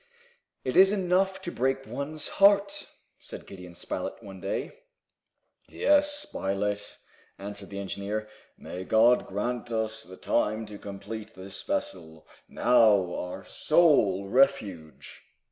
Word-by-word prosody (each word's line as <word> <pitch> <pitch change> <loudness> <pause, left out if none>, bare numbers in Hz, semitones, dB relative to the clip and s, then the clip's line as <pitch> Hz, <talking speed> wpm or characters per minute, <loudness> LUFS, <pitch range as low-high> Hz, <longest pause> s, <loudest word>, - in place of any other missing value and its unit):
"It 130 - -2
is 190 +1 +7
enough 190 -1 +1
to 175 - -4
break 135 0 0
one's 140 +5 -4
heart!" 200 0 +4 0.3
said - - -10
Gideon 90 -2 -11
Spilett, - - -5
one 95 -2 -10
day. 100 - -3 1.0
"Yes, 295 0 +3
Spilett," 100 +1 -3 0.4
answered 100 0 -8
the 100 - -7
engineer. 100 +2 -4 0.3
"May 90 +1 -7
God 115 +5 +4
grant 120 +5 -3
us 110 -1 -2
the 95 -4 -12
time 110 -1 0
to 105 -1 -9
complete 105 +2 -8
this 95 +1 -8
vessel, 80 -4 -4 0.2
now 110 -7 +4
our 90 - -5
sole 105 - +3
refuge!" 100 - 0
110 Hz, 120 wpm, -28 LUFS, 100-135 Hz, 1.0 s, is